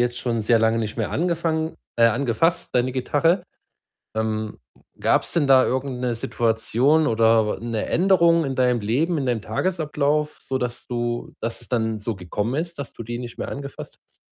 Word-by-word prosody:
jetzt 120 0 0
schon 115 -2 -1
sehr 115 +1 +4
lange 110 0 +2
nicht 110 0 -3
mehr 110 - -1
angefangen 165 -1 -1 0.2
äh, 115 - +5
angefasst, 130 +7 +1
deine 125 +1 +2
Gitarre. 150 +7 +1 0.7
Ähm, 110 -1 -2 0.4
gab's - - +1
denn 165 -4 +2
da 130 -1 +6
irgend 130 -1 -2
'ne 120 -2 -1
Situation 115 +7 +1
oder 110 -1 +3
'ne 115 -2 -2
Änderung 170 -3 +4
in 135 -1 -3
deinem 125 -2 +2
Leben, 140 +12 0
in 140 -3 -1
deinem 120 -4 0
Tagesablauf, 150 - -1
sodass 125 -2 -4
du 120 -1 -3
dass 115 0 -3
es - - -14
dann 110 -3 0
so 110 0 -3
gekommen 105 +7 -3
ist, 170 -1 -6
dass 140 - -6
du 115 - -8
die 120 +1 -4
nicht 120 -1 -8
mehr - - -4
angefasst 140 0 -7
hast? - - -20
125 Hz, 175 wpm, -23 LUFS, 115-150 Hz, 0.7 s, da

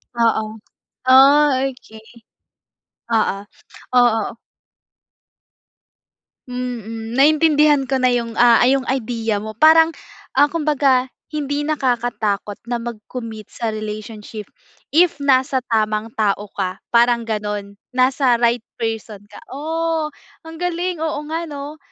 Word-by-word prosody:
Oo. 230 -2 +2 0.7
Oh, 280 +3 +7 0.2
okey. 220 -4 -9 1.1
Oo, 205 -2 +1 0.5
oo. 230 -3 +2 2.1
Mhm. 230 -2 -5
Naintindihan 295 -1 +4
ko 270 - 0
na 250 - +4
yung, 230 -2 -2
ah, 240 -1 +6
yung 270 0 +2
idea 230 -4 -2
mo. 215 0 -7
Parang 320 +4 +6 0.4
ah, 290 - +5
kumbaga 290 -5 +2 0.3
hindi 290 -1 -2
nakakatakot 240 -8 -1
na 240 - 0
mag-commit 225 -1 -7
sa 230 -2 -3
relationship. 215 0 -7 0.5
If 340 +1 +4
nasa 265 -1 +2
tamang 215 0 0
tao 205 -1 0
ka, 185 -1 -3 0.2
parang 235 0 +4
ganun. 210 -2 -4 0.2
Nasa 255 -1 +3
right 235 -1 +2 0.2
person 225 -3 -4
ka. - - -13 0.2
O 320 +2 -2 0.4
ang 325 0 -9
galing, 355 0 -2
oo 315 -2 -2
nga 330 +1 -2
'no? 290 +1 -7
245 Hz, 110 wpm, -20 LUFS, 220-290 Hz, 2.1 s, Oh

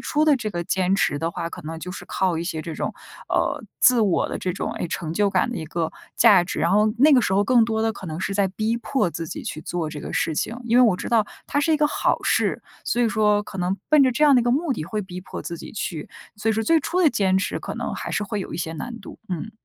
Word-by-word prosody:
初 305 0 +1
的 300 -3 +5
这 220 -3 -3
个 175 -4 -3
坚 185 +2 +1
持 145 -7 +1
的 165 +2 -1
话， 165 0 -4
可 - - -8
能 160 +1 -6
就 180 +2 -7
是 - - -8
靠 185 -4 0
一 165 - -3
些 160 -3 -3
这 165 - -6
种， - - -3 0.3
呃， - - 0 0.2
自 250 -2 +6
我 200 -5 +2
的 - - -4
这 180 - -2
种， - - -3
诶， - - -3
成 160 -1 -4
就 205 +3 +2
感 190 +4 +1
的 240 - -4
一 160 - -5
个 165 0 -2 0.2
价 205 -7 +6
值。 175 - -4
然 170 - +2
后 210 +3 +4
那 295 +3 +6
个 255 - +6
时 190 - 0
候 200 - +4
更 240 +1 +4
多 220 -1 -1
的 225 0 +1
可 190 - -9
能 160 0 -5
是 195 - -2
在 195 0 +2
逼 215 +4 -1
迫 235 -5 0
自 165 +1 -5
己 - - -6
去 155 - -5
做 165 -1 -3
这 150 - -7
个 - - -7
事 160 - 0
情， 225 +9 -2
因 235 0 +2
为 - - +8
我 215 -7 +4
知 - - -5
道 225 -3 +3 0.2
它 - - -1
是 320 +2 +2
一 - - +4
个 300 0 +3
好 - - 0
事， - - +1 0.2
所 240 - +1
以 230 - +3
说 210 -2 +2
可 195 - -9
能 180 +2 0
奔 300 -2 +6
着 255 - +3
这 300 - -1
样 285 -2 +6
的 - - +5
一 - - -2
个 240 - +2
目 295 +1 +1
的 155 - -4
会 210 +4 -3
逼 185 -1 -8
迫 185 - -8
自 170 - -5
己 - - -9
去， 170 -6 -4 0.3
所 215 +2 -2
以 - - +4
说 225 +1 0
最 325 +9 +4
初 360 +6 -1
的 310 - +5
坚 190 -2 +2
持 190 - -1
可 - - -6
能 - - -4
还 - - -5
是 210 - -1
会 210 0 -3
有 - - -6
一 - - -3
些 165 -1 -3
难 235 +9 -6
度， - - -11
嗯。 180 +4 -4
200 Hz, 320 characters per minute, -23 LUFS, 170-235 Hz, 0.3 s, 为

